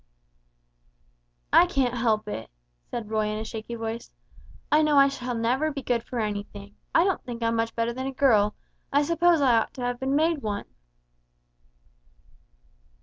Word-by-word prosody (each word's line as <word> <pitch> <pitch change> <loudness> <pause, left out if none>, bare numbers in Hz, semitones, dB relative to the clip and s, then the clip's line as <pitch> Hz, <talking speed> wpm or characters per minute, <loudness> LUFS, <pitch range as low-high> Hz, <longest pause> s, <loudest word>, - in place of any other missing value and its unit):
"I 355 - +7
can't 265 -8 0
help 225 -3 0
it," 110 - -5 0.4
said 220 -3 -5
Roy, 215 -1 +1
in 215 0 -2
a 220 - -4
shaky 220 +1 -6
voice; 225 0 -5 0.6
"I 300 +1 +5
know 305 -2 +3
I 275 0 +7
shall 250 -3 -4
never 250 +7 +1
be 280 -2 -6
good 240 -1 0
for 245 - -5
anything, 205 -1 -5 0.2
I 335 - +6
don't 380 -1 0
think 235 -1 -6
I'm 230 0 +1
much 225 0 -1
better 230 +1 0
than 260 +2 -4
a - - -2
girl, 220 -6 +3 0.4
I 285 +1 +3
suppose 335 +1 +3
I 245 -4 +5
ought - - -4
to 255 - -7
have 245 0 -2
been 265 +1 0
made 320 +1 +2
one." 205 -5 -4
240 Hz, 170 wpm, -26 LUFS, 220-275 Hz, 0.6 s, I